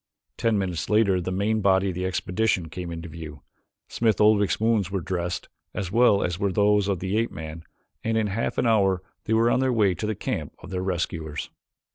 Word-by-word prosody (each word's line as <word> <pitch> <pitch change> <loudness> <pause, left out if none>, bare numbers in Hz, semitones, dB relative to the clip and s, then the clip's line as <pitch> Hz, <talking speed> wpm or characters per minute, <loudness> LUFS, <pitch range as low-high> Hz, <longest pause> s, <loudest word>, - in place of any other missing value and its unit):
Ten 115 -2 +1
minutes 90 -5 -2
later 100 -4 +3
the 90 - -3
main 105 +4 0
body 95 0 +3
of - - -3
the 90 +1 -2
expedition 95 -1 0
came 90 +1 -6
into 85 0 -6
view. 80 -3 -9 0.4
Smith 110 -3 +1
Oldwick's 105 -1 +4
wounds 110 -4 +2
were 95 0 -1
dressed, 90 0 -3 0.3
as 90 -3 -3
well 115 -3 +4
as 90 0 -2
were 100 -1 +1
those 105 0 +3
of 100 -2 0
the 95 +2 -1
ape 115 - 0
man, 80 +1 -8 0.4
and 110 0 0
in 110 - +2
half 105 +3 -2
an - - +1
hour 95 -5 +3 0.2
they 110 - 0
were 115 +1 +4
on - - +2
their 130 0 +2
way 105 -6 +3
to 100 +5 -4
the 110 - -1
camp - - -4
of 90 - -12
their 90 -1 -2
rescuers. 85 -4 -3
95 Hz, 210 wpm, -25 LUFS, 90-110 Hz, 0.4 s, Oldwick's